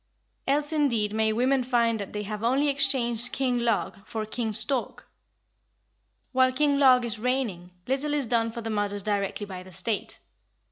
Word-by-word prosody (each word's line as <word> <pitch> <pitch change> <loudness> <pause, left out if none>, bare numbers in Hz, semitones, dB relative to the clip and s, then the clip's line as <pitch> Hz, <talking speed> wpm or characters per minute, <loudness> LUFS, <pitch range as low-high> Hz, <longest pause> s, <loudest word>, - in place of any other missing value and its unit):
Else 290 +3 +1
indeed 235 -9 +1
may 220 0 +2
women 255 +4 +2
find 235 -3 +1
that 200 - -6
they 210 0 -4
have 210 +1 -5
only 270 +5 +2
exchanged 260 -4 +3
King 255 -2 0
Log 200 -5 -1
for 220 0 -4
King 220 +1 -3
Stork. 250 +4 -3 1.2
While 260 0 +4
King 285 +1 +2
Log 255 -3 +6
is 225 -2 -4
reigning, 230 -8 -2 0.2
little 280 +3 -1
is 285 -3 +1
done 230 -1 +1
for 235 - -6
the 225 0 -4
mothers 205 -1 -2
directly 205 0 -1
by 185 -2 -8
the 185 0 -13
State. 190 +5 -3
235 Hz, 170 wpm, -26 LUFS, 210-265 Hz, 1.2 s, Log